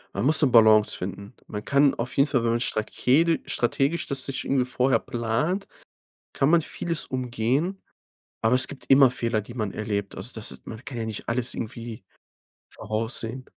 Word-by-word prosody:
Man 100 +5 -1
muss 155 +3 +5
'ne 145 - +4
Balance 110 -2 +5
finden. 100 +4 -6
Man 105 -1 -6
kann 140 +2 +3
auf 120 +2 -4
jeden 140 +2 +5
Fall, 130 -4 +1
wenn 115 - +2
man 115 - +1
strakedi 130 +8 +1
strategisch 135 +7 0
das 135 -2 -2
sich 135 -2 -3
irgendwie 135 -2 +1
vorher 130 +1 +2
plant, 120 - -2 0.7
kann 135 - +1
man 170 0 +5
vieles 165 +1 -3
umgehen, 130 - -1 0.6
aber 110 +3 +3
es 130 - +3
gibt 140 - -11
immer 135 -1 +7
Fehler, 115 -2 -1
die 105 +3 -9
man 110 -5 -3
erlebt. 100 -2 -3
Also 100 +7 -6
das 110 -2 -4
ist - - -13
man 110 +2 -8
kann 135 -2 -7
ja 115 - -2
nicht 110 0 -5
alles 120 0 -1
irgendwie 115 -1 -6 0.7
voraussehen. 115 +3 -4
120 Hz, 180 wpm, -25 LUFS, 110-135 Hz, 0.7 s, immer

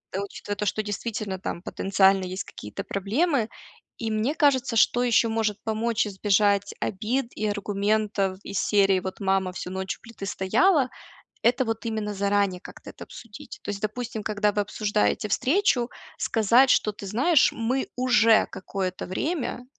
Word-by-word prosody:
учитывая 200 +1 -4
то, 210 +1 -3
что 215 +2 0
действительно 210 -1 -4
там 170 - -5
потенциально 195 0 +2
есть 185 +1 -4
какие-то 105 - -8
проблемы. 230 - 0 0.5
И 225 -1 -3
мне 215 +6 0
кажется, 270 -6 +2
что 245 +2 +4
ещё 235 -1 +3
может 220 -2 0
помочь 225 +1 0
избежать 200 0 +1
обид 230 +6 -1
и 215 - -1
аргументов 205 -1 0
из 200 - -3
серии: 195 -2 +3
"Вот 190 +4 -6
мама 190 -1 +1
всю 180 0 -6
ночь 190 0 -3
у - - -40
плиты 225 -3 -9
стояла",- 255 - +2 0.5
это 245 +2 +3
вот 225 0 -3
именно 215 -2 -2
заранее 200 -2 +1
как-то - - -12
это - - -10
обсудить. 230 -3 -11
То - - -6
есть, 200 -1 -6
допустим, 220 +1 -4
когда 210 0 +1
вы 205 0 0
обсуждаете 210 +1 0
встречу, 255 - +2 0.3
сказать 230 +4 +4
что: 215 - +3
"Ты 205 -1 -10
знаешь, 260 - +3
мы 245 +4 -1
уже 230 -3 +4
какое-то 190 -1 -4
время 250 - -3
210 Hz, 155 wpm, -25 LUFS, 195-235 Hz, 0.5 s, что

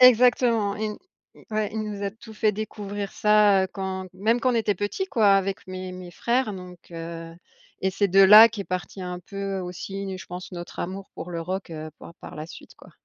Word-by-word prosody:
exactement, 240 -4 +5
ils 215 0 -2
nous - - -11 0.5
ouais 215 -1 0
il 220 - -2
nous 205 -1 -5
a 200 - -1
tout 220 +1 -13
fait 210 0 +2
découvrir 205 -1 -5
ça, 210 -2 +5
heu, - - -5
quand 190 -1 -4
même 220 +5 +2
quand 255 0 +2
on - - -1
était 210 -2 +1
petits 205 - -2
quoi, 220 - +3
avec 195 0 -4
mes 185 0 -6
mes 180 -1 -9
frères 240 +2 0
donc 180 -1 -9
heu, 165 0 -7 0.5
et 190 - +2
c'est 200 +1 +1
de 195 +2 +5
là, 210 +4 +10
qu'est 215 -3 -6
parti 185 +1 -4
un 180 0 -4
peu 195 0 -4
aussi 190 +2 -5
une 190 -1 -4
je - - -10
pense 180 +1 -8
notre 175 -1 -8
amour 190 +2 -5
pour 180 - -7
le 170 -1 -3
rock, 185 +1 -4
heu, 155 0 -6
par 170 - -12
par - - -10
la 155 +1 -6
suite - - -12
quoi. - - -16
195 Hz, 220 wpm, -25 LUFS, 185-215 Hz, 0.5 s, là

